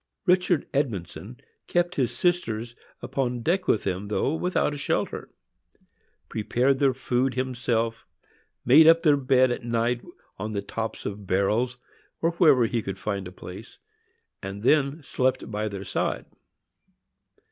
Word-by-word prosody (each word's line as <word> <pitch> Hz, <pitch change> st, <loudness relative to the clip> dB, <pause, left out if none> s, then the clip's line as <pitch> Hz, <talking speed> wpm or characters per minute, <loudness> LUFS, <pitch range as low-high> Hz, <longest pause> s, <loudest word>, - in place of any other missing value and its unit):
Richard 180 Hz, -3 st, +3 dB
Edmondson 115 Hz, -, -3 dB, 0.3 s
kept 175 Hz, 0 st, +1 dB
his 130 Hz, -8 st, +1 dB
sisters 120 Hz, -10 st, -1 dB, 0.3 s
upon 125 Hz, -3 st, -2 dB
deck 180 Hz, +4 st, 0 dB
with 110 Hz, -, +2 dB
him, 95 Hz, +1 st, -3 dB
though 105 Hz, +7 st, 0 dB
without 180 Hz, -2 st, 0 dB
a -, -, -5 dB
shelter; 140 Hz, -, -2 dB, 1.0 s
prepared 125 Hz, +5 st, +1 dB
their 135 Hz, -3 st, +3 dB
food 130 Hz, 0 st, 0 dB
himself, 120 Hz, -3 st, -1 dB, 0.6 s
made 150 Hz, +6 st, +8 dB
up 165 Hz, 0 st, +6 dB
their 150 Hz, -3 st, +6 dB
bed 130 Hz, -2 st, +3 dB
at 120 Hz, -, -3 dB
night 120 Hz, +1 st, 0 dB, 0.4 s
on 105 Hz, +2 st, -4 dB
the 100 Hz, -, -1 dB
top 110 Hz, +2 st, -5 dB
of 100 Hz, -1 st, -6 dB
barrels, 110 Hz, +7 st, +1 dB, 0.4 s
or 165 Hz, -, +1 dB
wherever 155 Hz, -8 st, +5 dB
he 115 Hz, 0 st, -1 dB
could 95 Hz, -2 st, -5 dB
find 100 Hz, -1 st, -3 dB
a -, -, -9 dB
place, 95 Hz, +3 st, -10 dB, 0.6 s
and 100 Hz, +2 st, -6 dB
then 145 Hz, +3 st, +2 dB
slept 130 Hz, -3 st, -1 dB
by 105 Hz, 0 st, -2 dB
their 100 Hz, -1 st, -6 dB
side. -, -, -2 dB
120 Hz, 140 wpm, -26 LUFS, 105-140 Hz, 1.0 s, made